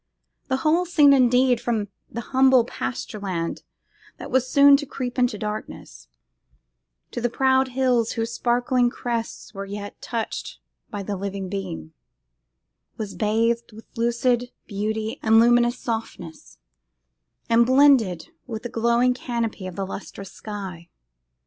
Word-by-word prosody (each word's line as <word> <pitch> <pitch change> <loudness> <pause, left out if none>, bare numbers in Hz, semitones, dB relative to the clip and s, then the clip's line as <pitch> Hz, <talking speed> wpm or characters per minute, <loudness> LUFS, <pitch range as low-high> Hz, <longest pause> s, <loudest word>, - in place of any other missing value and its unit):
The 260 -2 0
whole 335 +4 +3
scene, 295 -5 +6
indeed, 250 -1 +4
from 220 -4 -1 0.2
the 235 - -5
humble 260 -2 +5
pasture 240 -2 -5
land 175 -4 -3 0.6
that - - -8
was 260 -1 +1
soon 280 0 +7
to 290 0 -6
creep 250 -1 -4
into 245 -3 +2
darkness, 210 - -7 1.0
to 240 - -4
the 240 - +1
proud 265 +2 +2
hills 250 -3 +1
whose 230 0 -2
sparkling 245 +1 +1
crests 235 -2 -4
were 195 -1 -5
yet 205 0 -7
touched 230 -2 -4 0.3
by 205 -4 -5
the 200 +1 -3
living 195 0 -4
beam, 80 - -5 1.0
was 210 -3 -5
bathed 230 +2 0
with 220 +1 -12
lucid 240 +1 +1
beauty 215 +2 -3
and 220 0 +5
luminous 240 +1 +4
softness, 225 -8 -6 0.9
and 235 +1 +4
blended 260 - +4 0.2
with 225 -2 -6
the 240 - -4
glowing 235 +2 +2
canopy 235 -6 -3
of 185 - -8
the 195 - -3
lustrous 195 0 -8
sky. 190 -5 -8
235 Hz, 135 wpm, -23 LUFS, 210-250 Hz, 1.0 s, soon